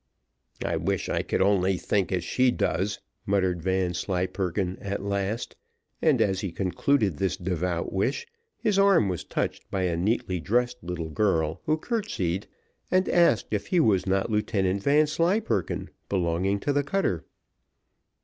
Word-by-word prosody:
"I - - 0
wish - - -1
I - - +1
could - - 0
only 95 -1 +2
think 100 +1 0
as 90 -2 0
she 130 +7 +2
does," 95 -3 -1 0.3
muttered 95 -3 +1
Vanslyperken 90 +1 -1
at 100 0 -4
last; 100 +3 -2 0.5
and - - +3
as 95 -2 0
he 95 - -3
concluded 95 - +1
this 95 +2 0
devout 90 -1 -2
wish, 100 - 0 0.3
his 210 -4 +1
arm 195 - +5
was 90 -3 -3
touched - - -3
by 95 -1 -1
a 90 -2 +1
neatly 90 0 0
dressed 120 +7 0
little 85 -2 -4
girl, 80 -5 +1
who 155 +1 +3
curtsied, 155 - -2 0.4
and 185 0 +2
asked 170 -10 +3
if 105 -1 -1
he 180 - +2
was 100 - +3
not 95 +3 +1
Lieutenant 100 -2 0
Vanslyperken, 155 - +1 0.2
belonging 95 +2 0
to 145 - 0
the 145 - +3
cutter. 140 - -1
95 Hz, 145 wpm, -26 LUFS, 90-125 Hz, 0.5 s, arm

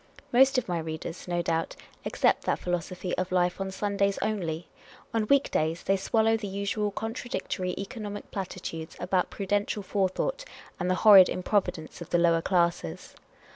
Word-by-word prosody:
Most 265 +2 +6
of 255 - 0
my 175 -2 -1
readers, 160 +2 -6
no 175 -1 0
doubt, 165 -1 -1 0.3
accept - - +2
that - - +1
philo 175 0 -1
sophy 180 +2 -5
of 185 0 -2
life 180 +1 +1
on 195 - -2
Sundays 200 0 0
only; 170 -6 -2 0.5
on 220 -2 0
week 280 +2 +3
days 160 +2 0
they 195 - +2
swallow 225 +3 +2
the 220 -2 -4
usual 200 +2 -1
contradictory 215 -4 -3
economic 205 0 -6
platitudes 180 -4 -5
about 180 0 0
prudential 205 +1 -1
forethought 205 - -1 0.4
and 180 0 -1
the 185 - +3
horrid 195 -4 +10
improvidence 180 -4 -1
of 170 - -8
the 175 - +3
lower 170 -1 +3
classes. 170 - 0
190 Hz, 160 wpm, -28 LUFS, 175-205 Hz, 0.5 s, horrid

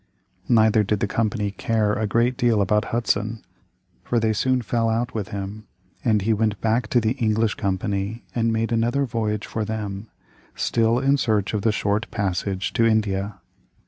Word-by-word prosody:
Neither 110 -2 +5
did 105 0 0
the - - +1
Company 105 -1 -1
care 105 +1 0
a 110 0 -1
great 120 +4 +2
deal 120 -4 +2
about 105 +2 +2
Hudson, 110 -1 -1 0.6
for 120 - +1
they 110 -1 +1
soon 130 +3 +1
fell 115 +1 0
out 115 +2 -1
with 105 -4 -3
him, 100 +2 -6 0.4
and 105 -4 +2
he 110 +2 +2
went 105 -1 0
back 115 +2 +1
to 125 - +3
the 110 -1 +1
English 110 -2 +2
company 100 +3 -2
and 115 -1 +1
made 115 +1 -1
another 120 +5 +1
voyage 110 -4 -2
for 110 - -3
them, 105 -1 -4 0.5
still 115 0 +2
in 135 +2 +3
search 110 -6 0
of 105 - 0
the 110 - +2
short 105 +1 -1
passage 95 0 -2
to 115 - +2
India. 105 -3 +1
110 Hz, 175 wpm, -23 LUFS, 105-115 Hz, 0.6 s, Neither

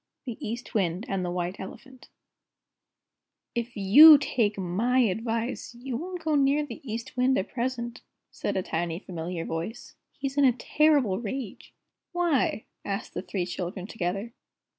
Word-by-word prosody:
THE 240 -4 -6
EAST 235 +3 -5
WIND 185 -2 0
AND 195 -2 -1
THE 180 - -2
WHITE 180 +1 -3
ELEPHANT 260 +6 -10 1.4
"If 235 0 -4
you 290 +11 +10
take 230 -7 0
MY 200 +8 0
advice, 230 +2 0
you 245 +1 -5
won't 355 +5 -5
go 315 -1 0
near 285 +1 +3
the - - -9
East 230 0 -6
Wind 255 +1 +3
at 190 - -2
present," 240 -1 -3 0.3
said - - -3
a 190 - 0
tiny, 165 0 -2
familiar 170 -2 -5
voice, 165 +8 -5 0.2
"he's 275 0 -2
in 280 - +6
a 255 - +5
terrible 265 -5 +2
rage!" 235 -1 -6 0.4
"Why?" 335 -10 +1 0.2
asked 200 +1 -4
the - - -3
three 180 -1 -3
children 180 +1 -5
together. 200 +2 -3
230 Hz, 150 wpm, -27 LUFS, 190-265 Hz, 1.4 s, you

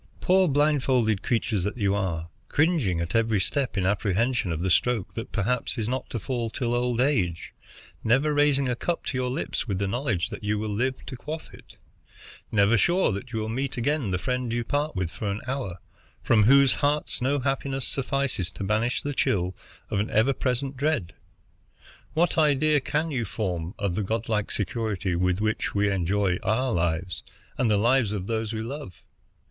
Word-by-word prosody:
Poor 185 0 +4
blindfolded 135 - +2
creatures 110 -5 0
that 105 +5 -2
you 100 -3 +1
are, 85 -5 -2 0.2
cringing 145 - +2
at 85 0 -3
every 115 -2 +2
step 130 +5 -1
in 95 - +1
apprehension 105 +2 +1
of 80 0 -2
the 95 - 0
stroke 115 +1 +1
that 115 - -6
perhaps 115 +3 -1
is 110 -2 -1
not 130 +2 -3
to - - -3
fall 120 +1 -2
till 120 +1 -2
old 120 -1 0
age, 100 - 0 0.5
never 135 +7 +3
raising 145 -2 +3
a 125 - 0
cup 170 +7 -2
to - - -3
your 125 0 0
lips 125 - -2
with 100 -4 -1
the 100 +1 0
knowledge 110 - -1
that 105 - -7
you 105 +1 0
will 105 0 -2
live 130 +5 -1
to 130 - -6
quaff 155 +6 -7
it, - - -15 0.8
never 105 +1 +4
sure 175 - +3
that 105 +5 -5
you 115 - -3
will 110 0 -2
meet 130 +4 -2
again 140 -1 0
the 90 - 0
friend 125 +5 -2
you 120 0 0
part 145 +3 -1
with 90 -3 -1
for 105 - -4
an 100 +1 -2
hour, 130 -9 -3 0.5
from 110 -3 +4
whose 135 +2 +6
hearts 145 -2 0
no 135 +3 +2
happiness 135 0 -1
suffices 135 -9 -1
to 100 - -7
banish 110 +5 0
the 145 - -2
chill 90 -7 0 0.4
of 105 - +1
an 105 - -1
ever 115 +6 +3
present 135 +1 -1
dread, 135 - -1 1.0
what 170 +1 +2
idea 150 0 +4
can 155 +4 -1
you 125 -4 -1
form 90 -4 -3
of 100 -4 -1
the 105 - -1
Godlike 110 0 -1
security 100 -3 -2
with 90 +1 +1
which 110 0 -1
we 100 0 +2
enjoy 95 0 +1
our 125 +3 +1
lives 85 +1 -1 0.4
and 120 - +3
the 105 - +3
lives 120 0 +3
of 100 -3 -3
those 110 0 -2
we 110 -1 -3
love! 130 - -7
115 Hz, 190 wpm, -26 LUFS, 100-135 Hz, 1.0 s, whose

